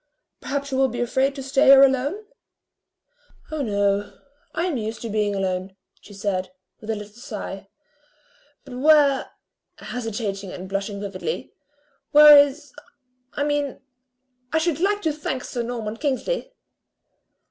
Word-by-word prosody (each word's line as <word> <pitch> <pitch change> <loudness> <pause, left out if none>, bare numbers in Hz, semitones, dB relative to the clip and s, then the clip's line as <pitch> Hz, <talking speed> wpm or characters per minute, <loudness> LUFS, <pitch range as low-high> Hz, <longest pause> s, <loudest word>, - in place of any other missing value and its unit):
Perhaps 280 0 -4
you 260 - -1
will 270 - +4
be 240 -1 -6
afraid 265 +3 +1
to 270 - -6
stay 270 +1 +2
here 275 0 +9
alone?" 275 +10 +1 1.3
"Oh 310 -1 -2
no, 200 -3 0 0.3
I 335 - -1
am 340 -7 -1
used 220 0 -5
to 230 - -4
being 210 -1 0
alone," 190 0 -2 0.3
she - - -15
said, 195 -2 -3 0.3
with 215 - -11
a 220 - 0
little 210 0 -9
sigh, 210 -5 -7 1.0
"but 265 - -10
where" 290 -2 +4 0.5
hesitating 210 -5 -5
and 185 +1 -8
blushing 200 +1 -3
vividly, 200 - -5 0.6
"where 300 0 +10
is 285 0 +3 0.6
I 285 - -1
mean, 290 -2 -1 0.7
I 320 - +2
should 320 -2 0
like 410 +3 +1
to 315 -2 +1
thank 290 -4 -4
sir 245 - -4
Norman 230 -2 -4
Kingsley." 310 - -2
250 Hz, 140 wpm, -23 LUFS, 205-285 Hz, 1.3 s, where